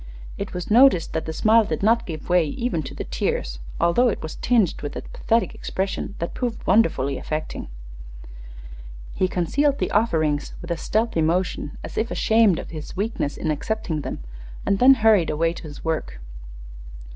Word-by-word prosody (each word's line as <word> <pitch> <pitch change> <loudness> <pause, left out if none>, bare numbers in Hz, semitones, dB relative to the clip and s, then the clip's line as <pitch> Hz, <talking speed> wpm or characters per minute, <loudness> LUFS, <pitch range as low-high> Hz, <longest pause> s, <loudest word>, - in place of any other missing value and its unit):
It - - -6
was 180 +3 -5
noticed 235 -7 +5
that 160 - -2
the - - -2
smile 220 +7 +4
did 205 - -3
not 230 +2 +3
give 155 -3 -6
way 180 -2 +3
even 220 - -2
to 145 - -8
the - - -4
tears, - - -2 0.2
although 170 +9 +3
it 225 - -2
was 160 - -5
tinged 230 -7 +1
with 145 - -5
a - - -5
pathetic 230 +1 0
expression 195 +1 -3
that 170 - -4
proved 245 -3 -3
wonderfully 140 - +2
affecting. 155 0 -4 1.5
He 185 - +1
concealed 275 - +1
the - - -2
offerings 155 -9 +1
with 175 - -7
a - - +1
stealthy 215 0 0
motion, 165 -2 -1
as - - -4
if 225 +2 -1
ashamed 220 -5 +3
of - - -7
his 155 +2 -8
weakness 200 -8 -2
in 155 - -1
accepting 160 -1 -2
them, - - -6 0.4
and 195 - +1
then 270 +2 +8
hurried 220 -7 +4
away 165 +2 +1
to - - -9
his 150 -2 -10
work. 160 - -2
180 Hz, 175 wpm, -23 LUFS, 155-225 Hz, 1.5 s, then